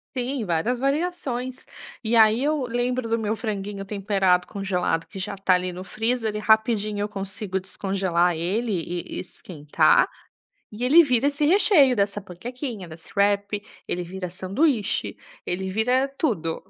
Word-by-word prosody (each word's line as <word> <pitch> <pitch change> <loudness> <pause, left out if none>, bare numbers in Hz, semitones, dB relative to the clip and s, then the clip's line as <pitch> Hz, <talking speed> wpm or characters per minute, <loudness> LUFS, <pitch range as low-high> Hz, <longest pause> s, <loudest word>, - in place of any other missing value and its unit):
Tem 255 -1 -2
várias 185 +8 0
variações. 275 -3 -2 0.4
E 230 0 0
aí 220 +1 +5
eu 300 0 +1
lembro 245 0 -1
do 230 0 +1
meu 215 0 -1
franguinho 205 -3 -4
temperado 195 -3 +1
congelado 180 -4 -1
que 195 - -9
já 200 +2 -3
está 195 -1 +3
ali 180 0 -2
no 180 +1 -7
freezer, 225 +3 -1
ele 210 0 -4
rapidinho 215 -1 +2
eu 205 - -2
consigo 195 -1 -4
descongelar 185 -2 0
ele 195 +8 -1
e 175 -2 -2 0.2
e - - -2
esquentar, 150 -5 +1 0.7
e 210 +3 -7
ele 295 +7 +7
vira 255 -3 +2
esse 290 +1 +2
recheio 310 -6 +5
dessa 200 -1 0
panquequinha, 220 - -7
desse 160 0 -12
wrap, 200 0 +1 0.2
ele 180 - -2
vira 180 +1 -6
sanduíche, 205 - 0 0.3
ele 190 +2 -2
vira 250 +7 +1
tudo. 170 - -1
210 Hz, 150 wpm, -24 LUFS, 190-245 Hz, 0.7 s, ele